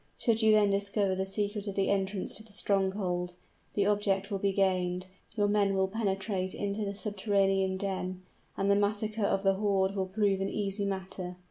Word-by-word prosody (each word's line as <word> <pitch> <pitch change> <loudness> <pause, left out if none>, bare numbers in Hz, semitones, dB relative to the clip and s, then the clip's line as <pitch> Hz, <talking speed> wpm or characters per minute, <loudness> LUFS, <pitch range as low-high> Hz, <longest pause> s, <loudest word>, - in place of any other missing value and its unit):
Should 230 -2 +2
you 220 0 +5
then 210 -1 +5
discover 200 0 +1
the 190 +1 -2
secret 205 +1 -2
of 200 - -3
the 195 0 +1
entrance 195 -1 -1
to 215 - -2
the 215 -2 -18
stronghold, 190 -3 0 0.4
the 200 - +2
object 205 -1 +1
will 200 - -1
be 200 0 +1
gained, 185 -2 +1 0.3
your 205 -2 +2
men 205 -1 +2
will 190 0 +2
penetrate 195 -2 -2
into 205 +1 -2
the 200 0 -3
subterranean 195 -2 +1
den, 185 -1 -3 0.3
and 195 +1 +2
the - - +5
massacre 210 +2 0
of 195 -1 +1
the 195 0 +4
horde 195 -1 +1
will 190 -1 -1
prove 195 0 +1
an 195 - 0
easy 200 0 -2
matter. 190 -2 -4
195 Hz, 190 wpm, -30 LUFS, 190-205 Hz, 0.4 s, you